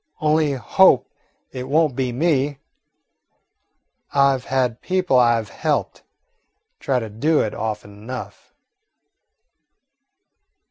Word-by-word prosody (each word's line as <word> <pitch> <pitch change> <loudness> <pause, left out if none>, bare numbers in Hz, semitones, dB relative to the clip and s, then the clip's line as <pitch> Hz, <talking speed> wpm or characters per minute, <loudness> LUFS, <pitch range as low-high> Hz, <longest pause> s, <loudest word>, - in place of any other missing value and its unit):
Only 155 -1 +2
hope 130 - +3 0.4
it 130 0 -7
won't 155 -2 +2
be 130 -1 -1
me. 145 0 0 1.5
I 140 -1 +4
've 125 - -8
had 125 -3 -1
people 185 -8 +1
I 120 -1 +4
've 110 -3 -8
helped - - -2 0.8
try 135 - 0
to 115 -3 -3
do 145 +9 +1
it 110 - -2
often 105 -1 -5
enough." 115 +5 -9
130 Hz, 105 wpm, -21 LUFS, 120-145 Hz, 1.5 s, I